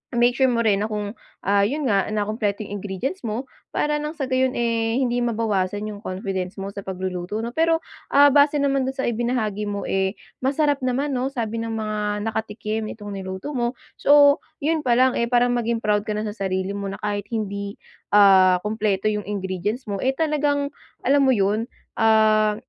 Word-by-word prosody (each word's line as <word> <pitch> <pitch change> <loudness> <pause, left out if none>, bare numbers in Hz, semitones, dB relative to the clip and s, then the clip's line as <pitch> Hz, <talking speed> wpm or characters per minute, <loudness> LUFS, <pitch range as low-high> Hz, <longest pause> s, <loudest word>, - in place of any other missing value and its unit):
make 240 +1 +4
sure 265 -1 +4
mo 235 -2 +1
rin 205 -3 +3
na 215 - -1
kung 210 -1 -3 0.3
ah, 200 +1 +3
yun 295 +6 -2
nga 200 -6 +2
na 210 -1 0
kumpleto 215 0 -2
yung 205 0 -6
ingredients 205 - -4
mo, 225 +3 -2 0.3
para 295 0 +1
nang 300 +2 -4
sa 285 - -3
gayon 260 0 +2
eh 230 -1 0
hindi 245 -2 +1
mabawasan 210 -4 0
yung 205 - -8
confidence 185 -2 -4
mo 195 0 -5
sa 200 - -7
pagluluto, 185 +2 -4
'no? 235 - -3
Pero 325 +3 +2 0.3
ah, 285 +1 +7
base 285 +1 +5
naman 275 -2 +1
dun 265 - -3
sa 265 - -2
ibinahagi 225 -3 -1
mo 200 -1 -3
eh, 190 +1 0 0.2
masarap 285 +2 +1
naman, 265 +2 -1
'no? 255 0 0
Sabi 230 -4 -3
ng 225 0 -3
mga 215 -1 -3 0.3
nakatikim 215 0 -3
itong 205 -1 -8
niluto 190 +7 -5
mo, 245 -2 -1 0.2
so 285 0 +6 0.2
yun 320 +2 +2
pa 240 -1 +4
lang 255 0 +3
eh 235 - +1
parang 245 0 +3
maging 235 -1 -1
proud 210 0 +1
ka 215 - -1
na 210 - -2
sa 210 - -3 0.2
sarili 190 +1 -1
mo 200 0 -4
na 195 - -5
kahit 205 -1 -2
hindi 200 -3 -4 0.4
ah, 190 -3 +6
kumpleto 210 -1 0
yung 210 -1 -3
ingredients 205 +4 -3
mo, 200 -1 -2
eh 265 +1 0
talagang 290 -2 0 0.3
alam 275 +1 +4
mo 260 - +4
yun, 210 +3 +1 0.3
ah, 215 -1 +4
220 Hz, 195 wpm, -23 LUFS, 205-255 Hz, 0.4 s, ah